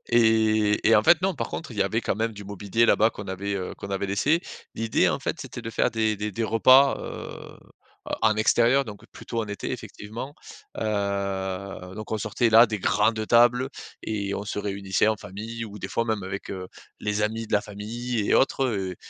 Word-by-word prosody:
Et 110 -2 +3
et 115 - +7
en 105 - +4
fait, 170 -1 +5
non, 190 +1 +2
par 155 - -3
contre, 160 -5 -6
il 110 - -9
y - - +5
avait 100 +4 0
quand 105 - -1
même 115 +1 -1
du 105 -1 -9
mobilier 100 +3 0
là-bas 110 0 +4
qu'on 100 -3 -9
avait, 100 +2 -3
heu, 90 -2 -4
qu'on - - -7
avait 100 0 -1
laissé. 145 - +2 0.3
L'idée, 115 0 +2
en - - -1
fait, - - -3
c'était 120 - -7
de 115 - -5
faire - - +1
des 110 -1 +1
des 105 +1 -4
des 115 +4 -3
repas, 130 +5 +5
heu, - - -8 0.5
en - - -2 0.2
en - - -6
extérieur, 120 +5 +3
donc 105 -3 -10
plutôt 115 -1 -4
en 110 - -3
été 100 -1 -5
effectivement. 115 +7 -7 0.4
Heu, 100 -2 -3
donc, 110 +1 -8
on 110 - -1
sortait 115 +3 0
la 115 +2 +8
des 105 -3 -4
grandes 110 +3 +2
tables 120 +2 +5 0.3
et 100 -2 -2
on 100 - -4
se 105 - -4
réunissait 100 0 0
en 110 - +2
famille 110 +4 -7
ou 105 -1 -9
des 95 - -4
fois 115 +4 -1
même 110 -4 -2
avec, 95 +1 -6
heu, 95 -1 -5 0.3
les 105 0 -1
amis 110 +2 -1
de - - -11
la 105 - +4
famille 110 +2 -4
et - - +4
autres, 135 0 +3
heu, 95 -6 -2
110 Hz, 215 wpm, -25 LUFS, 100-115 Hz, 0.5 s, la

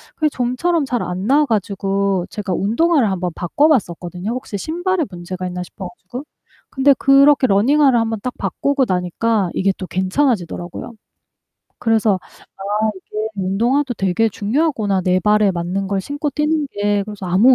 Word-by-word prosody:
그게 310 -1 +1
좀처럼 280 +6 0
잘 245 -2 -1
안 185 +4 -4
나아 295 +3 +4
가지고 195 -3 0
제가 200 -3 -4
운동화를 240 - +2
한번 180 -2 -2
바꿔 280 - +2
봤었거든요, 180 - -1
혹시 250 -5 -4
신발에 350 - -1
문제가 180 +1 -6
있나 180 0 -4
싶어 185 +1 -8
가지고. 215 +9 -9 0.5
근데 275 +1 +4
그렇게 275 0 +5
러닝화를 255 +5 +4
한번 225 -1 -1
딱 250 - -3
바꾸고 280 -2 0
나니까 185 +2 0
이게 195 +1 +1
또 185 - -5
괜찮아지더라고요. 185 - -1 0.9
그래서 220 -4 +2 0.4
'아 210 +3 0
이게 215 +3 -5
운동화도 235 +8 0
되게 195 +4 +1
중요하구나. 210 - 0
내 185 0 +2
발에 210 +1 +3
맞는 180 +3 -3
걸 195 -1 -1
신고 290 - -3
뛰는 300 +1 0
게.' 205 0 0
그래서 205 -2 -8
아무' 205 +9 +5
210 Hz, 355 characters per minute, -19 LUFS, 190-270 Hz, 0.9 s, 그렇게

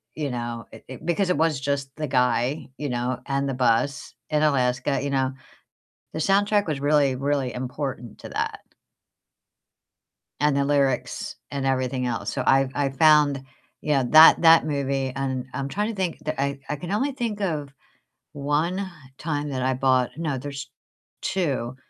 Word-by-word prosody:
you 150 -2 -2
know, 120 -1 -4
it - - -13
it 130 +4 -10
Because 175 +3 +1
it - - +1
was 160 -3 +1
just 140 0 -2
the 155 -1 -3
guy, 125 +2 +1
you 145 0 -3
know, 125 +1 -2
and 140 0 -1
the - - -1
bus 125 +3 +1 0.2
in 150 0 +1
Alaska, 130 -1 +1
you 140 - -1
know. 135 -1 0 0.8
The - - -4
soundtrack 205 +4 +2
was 150 -3 -2
really, 145 -2 +3
really 135 -2 -1
important 125 -1 -5
to - - -9
that - - -3 1.8
and 150 0 +2
the 140 - +2
lyrics 140 -3 0
and 140 -1 -3
everything 130 -1 0
else. 115 -4 -2
So - - -2
I 135 0 +4
I 140 -1 0
found, 145 -1 +4 0.4
you 150 - -1
know, 135 -2 +2
that 155 +1 +9
that 165 0 +7
movie, 135 -3 -1
and 130 -2 -2
I'm 135 +1 -3
trying 210 +8 -1
to - - -5
think. 185 -4 -2
The 155 -3 -2
I 140 0 -1
I - - -2
can 175 +6 -6
only 270 +7 0
think 230 -5 -3
of 155 -7 -2 0.6
1 160 +7 -1 0.3
time 150 -2 -3
that 130 -2 -2
I 130 +1 +1
bought 130 -1 +2
No, 155 -4 -2
there's 140 0 -6 0.5
2 140 -10 -1
140 Hz, 170 wpm, -24 LUFS, 130-155 Hz, 1.8 s, that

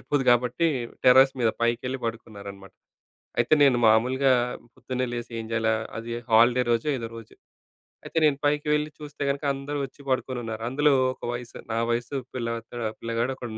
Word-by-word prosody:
సరిపోదు 145 -3 -1
కాబట్టి, 125 +7 +2 0.4
టెర్రస్ 130 +1 +7
మీద 115 - +4
పైకెళ్ళి 125 +3 0
పడుకున్నారనమాట. 100 -4 -8 0.7
అయితే, 120 +5 +3
నేను 130 -3 +5
మామూలుగా 130 +5 +4 0.4
పొద్దున్నే 130 0 -3
లేసి 120 0 -5
ఏం - - -8
చేయాలా? 110 0 +2 0.2
అది 115 +1 -7 0.2
హాలిడే 120 +3 +5
రోజో 115 +6 +1
ఏదో 115 -2 -5
రోజు. 115 -1 -13 0.7
అయితే 165 - -2
నేను 140 -2 +2
పైకి 150 0 +1
వెళ్ళి 150 0 0
చూస్తే 150 -1 -8
కనుక, 140 +2 -3
అందరూ 140 +2 -5
వచ్చి 135 - -23
పడుకొని 130 -1 -1
ఉన్నారు. 110 0 -5
అందులో 145 +2 +3 0.2
ఒక - - -34
వయసు 120 -1 -7 0.2
నా - - 0
వయస్సు 120 +4 -2 0.2
పిల్లలక్కడ 115 0 -4 0.2
పిల్లగాడు 115 +3 -1
ఒకడు 120 -2 -7
125 Hz, 160 wpm, -26 LUFS, 115-135 Hz, 0.7 s, టెర్రస్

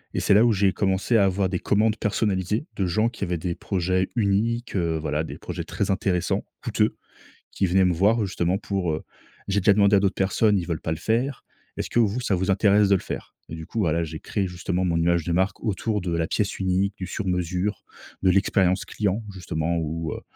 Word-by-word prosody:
et - - +1
c'est - - +3
là 105 - +6
où 120 - +4
j'ai 100 -1 +2
commencé 100 +4 +1
à 100 - +5
avoir 95 0 +1
des 90 - -2
commandes 110 +1 +2
personnalisées 105 - -1
de 95 -2 0
gens 110 +6 +1
qui 115 - -7
avaient 90 -2 -1
des 85 +1 -3
projets 95 0 -1
uniques, 115 +2 0
heu, 85 -3 0
voilà, 75 0 -1
des - - -7
projets - - -5
très 100 -1 -2
intéressants, 95 -2 0 0.2
coûteux, - - +1 0.6
qui 100 - 0
venaient 95 +1 +3
me 90 - +3
voir 105 +6 +3
justement 90 -1 0
pour, 95 -5 -2
heu: 75 - -4 0.5
«J'ai 100 +1 +2
déjà 100 +1 +5
demandé 100 0 +4
à - - +4
d'autres 100 -1 +1
personnes, 100 +2 +2
ils 90 - -2
veulent 85 -3 -3
pas 80 - -3
le 80 - -5
faire, 125 +4 -1 0.3
est-ce - - -4
que 120 - +1
vous 115 +2 +2
ça 100 -5 +1
vous 95 +2 0
intéresse 100 +1 +4
de 100 - +4
le - - -1
faire?» - - -7
et 80 - -6
du 80 0 -8
coup, 115 - -5
voilà, 85 -4 +1
j'ai 80 0 -7
créé 100 -3 -2
justement 90 +1 -2
mon 85 -2 0
image 85 -1 +1
de 85 - -1
marque 95 +2 0
autour 105 0 -1
de 90 -2 -2
la 85 0 0
pièce 100 +5 -1
unique, 95 +1 0
du 95 - -5
sur 95 +2 -4
mesure, 90 +3 -1 0.4
de 95 - +4
l'expérience 95 -1 +2
client, 105 +1 -1
justement 85 -2 -2
où, 80 0 -3
heu - - -7
95 Hz, 225 wpm, -24 LUFS, 90-105 Hz, 0.6 s, là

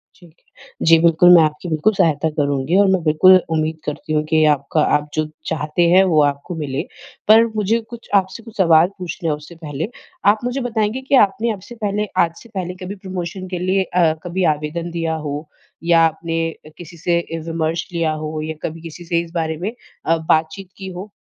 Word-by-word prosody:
ठीक 170 -3 -19
है। - - -22 0.2
जी, 165 - +8
बिल्कुल, 170 +1 +5
मैं 170 - +7
आपकी 155 +3 -2
बिल्कुल 160 +7 +2
सहायता 160 -3 +1
करूँगी, 140 +4 +1
और 200 - +5
मैं 190 -2 +2
बिल्कुल 160 +4 +6 0.2
उम्मीद 155 0 -1
करती 150 +1 -4
हूँ 150 0 +1
कि 155 0 +4
आपका 145 +2 -1 0.2
आप 150 0 -8
जो 155 0 0 0.2
चाहते 155 +1 -2
हैं, 185 +2 +6
वो 160 -5 +3
आपको 145 +4 -2
मिले। 135 -2 -2 0.5
पर 220 +2 +7
मुझे 215 +2 +1
कुछ 235 -1 -11
आपसे 190 +4 -11
कुछ 225 -2 -13
सवाल 170 -3 +5
पूछने 180 -2 -4
हैं 150 - +1
उससे 150 +3 -13
पहले। 155 +1 -5 0.4
आप 215 - -3
मुझे 250 +2 -2
बताएँगे 225 0 -1
कि 270 +1 +1
आपने 220 +4 -3
अब 195 - -9
से 240 - -9
पहले 205 +1 0 0.2
आज 165 -1 -3
से 235 - -16
पहले 180 -1 -3
कभी 195 +3 -6
प्रमोशन 185 -1 -6
के 180 -1 -4
लिए 190 +1 +1
अ, 175 -4 +2
कभी 180 +1 -2
आवेदन 160 +3 -5
दिया 165 -1 -2
हो, 145 +2 -5 0.4
या 170 -1 +4
आपने 165 +1 -2
अ, 155 - -16
किसी 170 0 -11
से 170 +1 0
ए 165 - -3
विमर्श 165 0 -2
लिया 165 -2 0
हो, 155 0 -4
या 160 +1 -4
कभी 160 +1 -5
किसी 165 +1 -9
से 170 0 +1
इस 165 -1 -10
बारे 160 -1 -1
में 190 +7 -3 0.3
अ, 165 - +2
बातचीत 160 +3 -1
की 190 -1 -7
हो? 195 +4 -8
170 Hz, 210 wpm, -19 LUFS, 155-190 Hz, 0.5 s, जी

